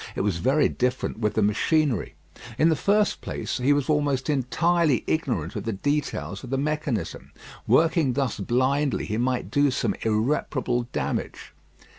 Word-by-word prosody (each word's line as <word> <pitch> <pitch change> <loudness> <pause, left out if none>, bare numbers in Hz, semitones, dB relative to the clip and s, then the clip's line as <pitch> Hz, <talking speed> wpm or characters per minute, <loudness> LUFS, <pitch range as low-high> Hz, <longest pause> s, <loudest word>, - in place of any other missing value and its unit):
It - - -1
was 95 -3 0
very 140 - +3
different 125 -3 -2
with 105 -2 0
the 110 - +2
machinery. 130 - +1 0.4
In 160 +4 +4
the 160 - +3
first 205 +5 +1
place, - - -4
he 130 +3 +2
was 145 -2 +2
almost 145 -2 +1
entirely 155 +2 +1
ignorant 115 - -1
of - - -3
the 115 - -1
details 145 +10 -2
of 125 - -8
the 135 - 0
mechanism. 140 - -3 0.4
Working 160 -5 +3
thus 135 -5 -1
blindly 130 +6 +1
he 110 - -3
might 125 +1 -1
do 145 0 +3
some 130 - 0
irreparable 120 +2 0
damage. 70 -1 -4
130 Hz, 155 wpm, -25 LUFS, 115-150 Hz, 0.4 s, In